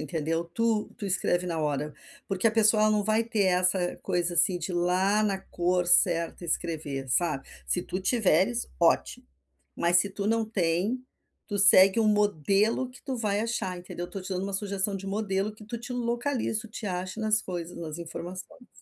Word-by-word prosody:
entendeu, 165 0 -2
tu 215 +5 0
tu - - -7
escreve 180 -1 0
na 170 -2 -2
hora. 150 -1 -2 0.3
Porque 195 +2 0
a - - +5
pessoa, 215 -1 +4
ela 215 - +4
não 210 -1 +2
vai 215 +2 +1
ter 225 -3 0
essa 180 -1 +2
coisa, 175 -2 -1
assim, 175 +2 +3
de 175 +2 -5
ir - - -3
lá 185 +4 +2
na 200 -2 0
cor 180 -1 -1
certa 170 0 +3
escrever, 155 -5 -3
sabe. 155 0 0 0.2
Se 180 - 0
tu 185 - -4
tiveres, 175 - +2
ótimo, - - +1 0.5
mas 170 +1 +2
se 195 +3 +3
tu 200 +1 -4
não 225 +1 +2
tem, 205 +4 -1 0.4
tu 205 -2 -3
segue 195 +1 +7
um 225 - +3
modelo 210 - +2
que 255 - -16
tu 265 -3 -4
vai 210 -3 0
achar, 215 -5 -2
entendeu. 175 0 -7
Estou 185 +2 -7
te - - -8
dando 190 0 -2
um 200 - -5
sugestão 200 0 -1
de 195 0 -6
modelo 200 0 -1
que 215 - -14
tu 235 +3 -6
te 245 +2 -7
localiza, 240 -1 -1
tu 225 - -11
te 215 0 -7
ache 185 +2 -4
nas 215 -1 +2
coisas, 175 -2 -6
nas 160 -1 -6
informações. 175 +7 -8
190 Hz, 190 wpm, -27 LUFS, 175-215 Hz, 0.5 s, segue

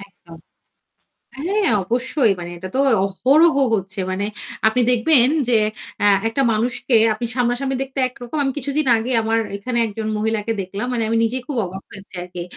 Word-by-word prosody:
একদম। 175 -4 -15 1.0
হ্যাঁ 395 +6 0
অবশ্যই। 245 +2 +1
মানে 175 0 -6
এটা 185 +2 -7
তো - - +1 0.3
অহরহ 275 - +3 0.2
হচ্ছে। 195 -1 -5
মানে 195 +2 -2 0.4
আপনি 245 +3 +2
দেখবেন 250 +1 +4 0.2
যে 230 - +4 0.4
অ্যা 205 - +3 0.2
একটা 225 +5 -1
মানুষকে 245 +2 0 0.2
আপনি 225 +3 -4
সামনাসামনি 250 +2 0
দেখতে 270 0 -7
একরকম। 245 +4 -8
আমি 270 - 0
কিছুদিন 285 +2 -1
আগে 230 +3 -3
আমার 225 +1 +1 0.2
এখানে 235 +4 -3
একজন 215 +1 -5
মহিলাকে 220 0 -1
দেখলাম। 195 +5 -5
মানে 230 -2 0
আমি 230 - +1
নিজেই 245 +2 -1
খুব 280 -4 -4
অবাক 190 +2 -7
হয়েছি 195 -1 -13
আরকি। 180 -1 -7
230 Hz, 160 wpm, -20 LUFS, 200-260 Hz, 1.0 s, দেখবেন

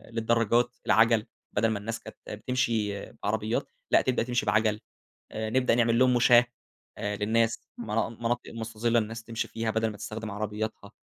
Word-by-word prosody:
للدراجات، 115 +1 +2
العجَل، 115 -1 +4 0.3
بدل 115 +2 +2
ما 110 -2 -1
الناس 115 +2 -4
كانت - - -12
بتمشي 110 -3 -1
بعربيات، 110 +2 -2 0.2
لأ - - +6
تبدأ 125 -3 +1
تمشي 120 0 -1
بعجَل، 105 0 +2 0.5
آآ، 110 0 -3
نبدأ 125 0 +3
نعمل 115 -1 +3
لهم 130 -1 +5
مُشاه 120 0 +6 0.5
آآ، 105 0 -2
للناس 115 +2 +1 0.2
منا 110 -1 -1
مناطق 115 +1 -3
مستظِّلة 115 +1 0
للناس 110 +1 -5
تمشي 115 -1 -3
فيها، 115 -1 -2
بدل 110 0 0
ما 105 - -8
تستخدم 110 +1 -6
عربياتها 105 +1 -4
115 Hz, 155 wpm, -28 LUFS, 110-115 Hz, 0.5 s, لأ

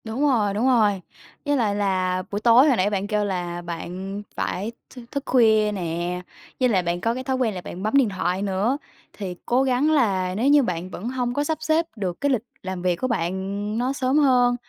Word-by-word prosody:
Đúng 225 +4 -4
rồi, 235 -9 +2
đúng 220 +6 +1
rồi. 210 -7 +3 0.4
Với 290 0 +2
lại 215 -5 +1
là 185 -2 0
buổi 205 - -1
tối 240 +5 +6
hồi 265 -5 +3
nãy 185 +2 +2
bạn 200 -1 -2
kêu 210 -1 0
là 175 -3 -3
bạn 180 +4 -6
phải 205 +5 -2 0.2
thư 250 -2 -11
thức 280 -1 -3
khuya 220 -4 +4
nè, 175 -1 -3 0.4
với 255 -1 +3
lại 190 -5 +2
bạn 175 +1 -2
có 230 +3 +1
cái 255 +2 -5
thói 265 0 -1
quen 240 -4 0
là 180 - -5
bạn 180 +1 -8
bấm 215 - -1
điện 260 -6 +4
thoại 185 -1 -1
nữa, 205 +6 0 0.4
thì 190 -4 -5
cố 250 +2 +2
gắng 265 +3 +2
là 190 -10 +1
nếu 230 +6 +1
như 290 0 +6
bạn 180 -3 -3
vẫn 185 +6 -5
hông 250 -1 -2
có 290 - 0
sắp 315 +1 -1
xếp 315 +1 +2
được 185 -5 -4
cái 285 - +2
lịch 250 -6 +1 0.2
làm 185 -1 -5
việc 180 -1 +1
của 255 - -2
bạn 175 -8 0 0.5
nó 250 +3 0
sớm 265 +1 +1
hơn, 250 -4 +4
210 Hz, 225 wpm, -23 LUFS, 185-255 Hz, 0.5 s, tối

